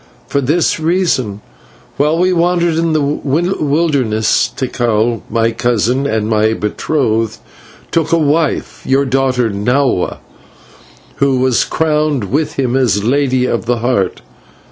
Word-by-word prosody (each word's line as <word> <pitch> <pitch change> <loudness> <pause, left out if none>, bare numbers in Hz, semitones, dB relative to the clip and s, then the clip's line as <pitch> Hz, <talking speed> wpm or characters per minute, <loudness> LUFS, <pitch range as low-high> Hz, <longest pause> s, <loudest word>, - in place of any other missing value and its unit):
"For 140 - -1
this 155 +5 +1
reason: 155 - 0 0.6
While 150 +3 +2
we 185 +1 +2
wandered 175 -1 +1
in 165 0 0
the 155 -2 +1
wilderness, 145 - 0
Tikal, 120 -3 0
my 115 +1 +1
cousin 120 +3 0
and 110 -4 -1
my 110 0 +2
betrothed, 115 0 -1 0.5
took 165 -2 0
a 165 - +4
wife, 155 0 0
your 135 +1 +1
daughter 130 -3 +1
Nahua, 120 +1 0 1.0
who 140 -1 +2
was 130 -1 +2
crowned 150 -8 -1
with 150 +3 0
him 130 -2 -1
as 115 -7 +1
Lady 130 +1 +1
of 115 -2 -2
the 120 0 +1
Heart. 115 -6 -1
130 Hz, 125 wpm, -15 LUFS, 115-155 Hz, 1.0 s, a